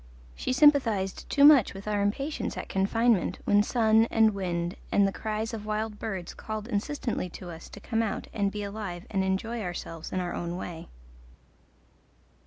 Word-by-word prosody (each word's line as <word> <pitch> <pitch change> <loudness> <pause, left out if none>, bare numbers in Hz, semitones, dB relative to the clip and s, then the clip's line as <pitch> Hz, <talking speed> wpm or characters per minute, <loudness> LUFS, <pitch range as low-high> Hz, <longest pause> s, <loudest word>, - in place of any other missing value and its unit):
She - - -3
sympathized 255 -9 +3
too 285 -1 +5
much 285 -9 +7
with 195 +2 -9
our 205 -1 0
impatience 275 +10 -2
at - - -5
confinement 210 +1 +1
when 205 0 +5
sun 220 0 +3
and 220 -1 +4
wind 175 -3 -2 0.2
and 200 -1 +4
the - - -1
cries 220 +2 -3
of 215 -1 -6
wild 215 0 -2
birds 190 -5 -4
called 215 0 -6
insistently 230 -3 -2
to 175 +1 -9
us 165 0 -10
to - - -10
come 225 +2 -1
out 225 - -2
and 200 -2 0
be 210 0 -4
alive 200 -3 -5
and 195 -2 +1
enjoy 220 +5 -1
ourselves 170 -3 -6
in 185 - -1
our 175 -1 -3
own 175 +1 -4
way. 170 -3 -7
205 Hz, 175 wpm, -28 LUFS, 190-225 Hz, 0.2 s, much